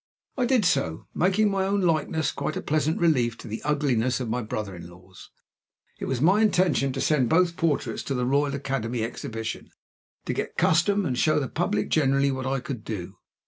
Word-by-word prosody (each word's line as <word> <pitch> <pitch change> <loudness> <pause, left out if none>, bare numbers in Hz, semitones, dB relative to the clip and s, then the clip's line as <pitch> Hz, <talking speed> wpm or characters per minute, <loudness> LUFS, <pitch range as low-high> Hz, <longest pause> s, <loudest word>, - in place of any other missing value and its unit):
I 250 -3 +1
did 250 -5 +3
so, 80 - 0
making 195 +4 +2
my 195 -1 0
own 200 +1 +1
likeness 160 -3 +1
quite 155 - -3
a - - -3
pleasant 155 +1 0
relief 125 -9 +2
to - - -10
the 110 +1 -5
ugliness 135 -5 +1
of 120 -4 -3
my 125 +2 -1
brother 105 -3 -4
in 85 0 -10
law's. 90 +1 -15 0.7
It - - -4
was 130 -2 -2
my 185 - +4
intention 180 -9 +2
to 135 - -4
send 135 -6 +2
both 170 +2 +3
portraits 165 -5 -1
to 135 - -2
the 125 -1 0
Royal 140 +2 +1
Academy 125 -4 -2
Exhibition, 115 0 -5 0.6
to - - -1
get - - -4
custom, 195 +5 +3
and 130 - -1
show 155 +4 +2
the 135 - -2
public 105 -2 -1
generally 140 -2 +2
what 130 -1 -3
I 135 0 0
could 120 -3 -6
do. 95 -3 -6
140 Hz, 195 wpm, -25 LUFS, 120-165 Hz, 0.7 s, my